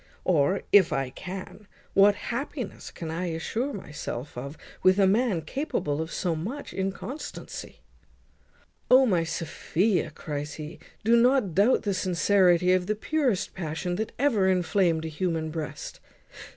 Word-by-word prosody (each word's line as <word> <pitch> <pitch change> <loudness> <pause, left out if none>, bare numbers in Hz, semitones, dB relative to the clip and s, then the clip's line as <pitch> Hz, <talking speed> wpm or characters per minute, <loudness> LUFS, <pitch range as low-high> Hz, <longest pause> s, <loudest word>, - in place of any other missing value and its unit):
Or, 180 +2 +2
if 200 -4 +6
I 135 -2 -1
can, 190 +5 -8 0.3
what 200 +1 +6 0.2
happiness 255 -2 -5
can 160 -2 -6
I 175 +3 -2
assure 220 - -2
myself 150 - -6
of 140 +5 -6 0.2
with 185 +1 +5
a 200 - +5
man 200 -3 +2
capable 155 - -2
of 160 +1 -5
so 175 -3 -1
much 225 - -5
inconstancy?" 195 +9 -6 1.1
"O! 260 +1 +7
my 180 -8 +2
Sophia," 170 +3 0
cries 150 -1 -5
he, 155 +2 -8 0.2
"do 230 +2 +5
not 240 -5 +3
doubt 205 +8 +4
the 205 -2 0
sincerity 180 -1 +3
of 185 -1 +1
the 215 - +1
purest 255 -3 0
passion 175 +1 -3
that 220 +1 -3
ever 230 -8 +3
inflamed 180 -3 +2
a - - -2
human 160 0 -2
breast. 155 -1 -6
185 Hz, 140 wpm, -27 LUFS, 160-210 Hz, 1.1 s, O